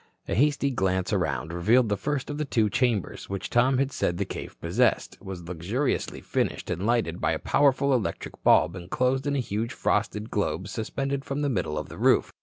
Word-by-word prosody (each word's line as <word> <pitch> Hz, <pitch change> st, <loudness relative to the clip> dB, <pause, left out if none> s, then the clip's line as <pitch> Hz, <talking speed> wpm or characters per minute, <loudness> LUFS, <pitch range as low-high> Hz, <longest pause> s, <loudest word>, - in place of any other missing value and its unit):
A -, -, -2 dB
hasty 140 Hz, +2 st, +2 dB
glance 95 Hz, -5 st, 0 dB
around 80 Hz, +2 st, -1 dB
revealed 110 Hz, +8 st, +3 dB
the 105 Hz, -, +2 dB
first 145 Hz, +5 st, -2 dB
of 145 Hz, -, -5 dB
the -, -, +1 dB
two 110 Hz, -7 st, +1 dB
chambers, 120 Hz, -4 st, 0 dB
which 95 Hz, -1 st, -4 dB
Tom 125 Hz, +2 st, +4 dB
had 135 Hz, +1 st, +1 dB
said 85 Hz, -, -1 dB
the 100 Hz, -, -1 dB
cave -, -, -7 dB
possessed, -, -, +1 dB
was 95 Hz, -2 st, -7 dB
luxuriously 90 Hz, -, -2 dB
furnished -, -, -2 dB
and 95 Hz, +5 st, -2 dB
lighted 115 Hz, -8 st, 0 dB
by -, -, +2 dB
a -, -, -1 dB
powerful 140 Hz, -1 st, +3 dB
electric 120 Hz, -6 st, -2 dB
bulb 85 Hz, -, +5 dB
enclosed 125 Hz, +10 st, 0 dB
in 145 Hz, -, +1 dB
a -, -, +1 dB
huge 115 Hz, -1 st, -2 dB
frosted 105 Hz, +2 st, -1 dB
globe 95 Hz, -2 st, -1 dB
suspended 135 Hz, +6 st, -3 dB
from 140 Hz, +2 st, -3 dB
the 145 Hz, -, +1 dB
middle 90 Hz, -, -1 dB
of 75 Hz, -, -3 dB
the -, -, -10 dB
roof. -, -, +3 dB
115 Hz, 200 wpm, -26 LUFS, 95-135 Hz, -, bulb